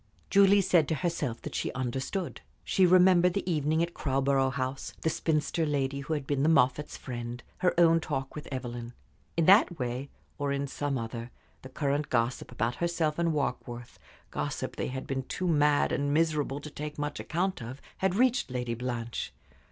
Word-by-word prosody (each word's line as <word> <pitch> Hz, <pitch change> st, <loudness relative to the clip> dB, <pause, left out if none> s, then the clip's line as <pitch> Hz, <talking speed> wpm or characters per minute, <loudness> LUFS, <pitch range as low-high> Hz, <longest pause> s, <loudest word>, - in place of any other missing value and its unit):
Julie 200 Hz, 0 st, +6 dB
said 175 Hz, -5 st, +3 dB
to 160 Hz, -, 0 dB
herself 150 Hz, -6 st, -2 dB
that -, -, -6 dB
she -, -, -1 dB
understood. 130 Hz, +8 st, -3 dB, 0.2 s
She 185 Hz, -1 st, +3 dB
remembered 180 Hz, 0 st, +5 dB
the 200 Hz, -, -2 dB
evening 160 Hz, -1 st, +1 dB
at 170 Hz, 0 st, -3 dB
Crowborough 135 Hz, -1 st, +1 dB
House, 130 Hz, 0 st, -4 dB
the 160 Hz, -, +1 dB
spinster 160 Hz, +1 st, 0 dB
lady 140 Hz, -2 st, 0 dB
who 140 Hz, +3 st, -3 dB
had 145 Hz, -2 st, -4 dB
been 140 Hz, -1 st, 0 dB
the 150 Hz, -, +4 dB
Moffatts' 140 Hz, -1 st, +2 dB
friend, 120 Hz, -1 st, -6 dB, 0.2 s
her 180 Hz, -2 st, +2 dB
own 165 Hz, -1 st, +6 dB
talk 135 Hz, -4 st, -3 dB
with 150 Hz, -, -7 dB
Evelyn. 120 Hz, -2 st, -5 dB, 0.4 s
In 165 Hz, -, +3 dB
that 190 Hz, -2 st, +6 dB
way, 125 Hz, +1 st, -3 dB, 0.3 s
or 145 Hz, -1 st, 0 dB
in 140 Hz, 0 st, -1 dB
some 140 Hz, 0 st, -2 dB
other, 115 Hz, 0 st, -5 dB, 0.3 s
the 130 Hz, -, -10 dB
current 140 Hz, +2 st, -1 dB
gossip 120 Hz, +1 st, 0 dB
about 120 Hz, 0 st, -1 dB
herself 170 Hz, -2 st, 0 dB
and 170 Hz, -1 st, +2 dB
Warkworth, 125 Hz, -5 st, -3 dB, 0.3 s
gossip -, -, -3 dB
they -, -, -2 dB
had 130 Hz, +1 st, -5 dB
been 135 Hz, -1 st, -2 dB
too 180 Hz, +7 st, -3 dB
mad 150 Hz, -3 st, +3 dB
and 145 Hz, 0 st, 0 dB
miserable 150 Hz, -3 st, +1 dB
to 150 Hz, -, -8 dB
take 150 Hz, +1 st, -6 dB
much 145 Hz, 0 st, -3 dB
account 185 Hz, +1 st, -1 dB
of, 125 Hz, +4 st, -7 dB, 0.2 s
had 190 Hz, -1 st, +1 dB
reached 250 Hz, -, +2 dB
Lady 125 Hz, -2 st, -2 dB
Blanche. 120 Hz, -1 st, -4 dB
145 Hz, 180 wpm, -29 LUFS, 130-165 Hz, 0.4 s, Julie